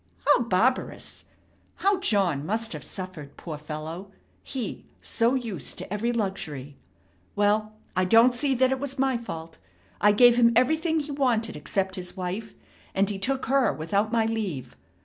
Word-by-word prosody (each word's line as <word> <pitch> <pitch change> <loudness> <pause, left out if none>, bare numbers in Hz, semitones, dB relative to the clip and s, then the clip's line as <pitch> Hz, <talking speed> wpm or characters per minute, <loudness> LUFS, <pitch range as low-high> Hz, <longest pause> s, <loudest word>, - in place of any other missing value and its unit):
How - - +5
barbarous! 235 +3 0 0.5
How 395 0 +2
John 195 - +1
must 220 +6 -2
have - - -6
suffered, 180 -7 -8
poor 155 -4 -6
fellow! 155 +5 -6 0.3
He, 255 -4 -5
so 235 +2 +1
used 230 -7 -4
to - - -6
every 225 +3 0
luxury! 160 - -3 0.6
Well, 210 +1 +2 0.2
I 185 - +3
don't 230 +6 +6
see 270 +2 0
that 260 +1 +3
it 265 - 0
was 275 0 -4
my 265 -1 +2
fault. 165 -9 -6 0.4
I 210 - +6
gave 240 +3 +6
him 235 -1 +5
everything 315 +6 +2
he 290 0 -6
wanted 240 -5 +1
except 190 +6 -1
his 180 +1 -6
wife, 190 +4 -4 0.4
and 195 +1 +2
he 195 - -4
took 265 +6 -1
her 270 -1 +3
without 200 +7 -1
my 230 -1 +2
leave. 210 - -3
220 Hz, 160 wpm, -26 LUFS, 185-250 Hz, 0.6 s, don't